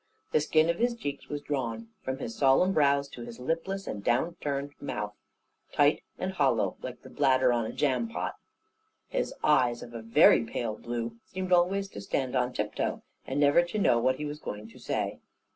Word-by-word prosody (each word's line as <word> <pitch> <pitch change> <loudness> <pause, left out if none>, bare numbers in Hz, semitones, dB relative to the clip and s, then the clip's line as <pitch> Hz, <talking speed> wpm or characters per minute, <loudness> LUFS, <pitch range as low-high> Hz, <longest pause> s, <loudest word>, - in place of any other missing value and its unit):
The 155 - +3
skin 155 +1 +3
of 170 0 0
his 240 0 +2
cheeks 145 -11 -5
was 145 0 -4
drawn, 115 -5 -3
from 130 0 -3
his 115 -4 -5
solemn 140 +9 +4
brows 140 -2 +3
to 120 - -10
his 120 0 -8
lipless 165 +8 -2
and 100 - -5
down 130 +10 +1
curved 140 0 -3
mouth, 105 0 -3 0.6
tight - - +3 0.2
and - - -2
hollow, - - +2
like - - -7
the - - -11
bladder 130 -3 +3
on 115 -2 0
a - - -4
jam 150 - 0
pot. 230 - -3 0.8
His - - -1
eyes, 125 -5 +3
of 120 - -11
a 115 - -5
very 115 +1 +6
pale 115 -1 -3
blue, 115 0 -4
seemed 185 0 -4
always 190 +3 +3
to 100 - -8
stand 130 +5 -2
on 125 0 +1
tip 105 -3 -2
toe, - - -2 0.2
and 135 +2 -1
never 145 +3 +6
to 175 +4 -4
know 120 - +4
what 130 +2 +2
he 150 - -5
was 150 0 -5
going 105 -6 -6
to - - -15
say. - - -2
135 Hz, 200 wpm, -29 LUFS, 120-155 Hz, 0.8 s, very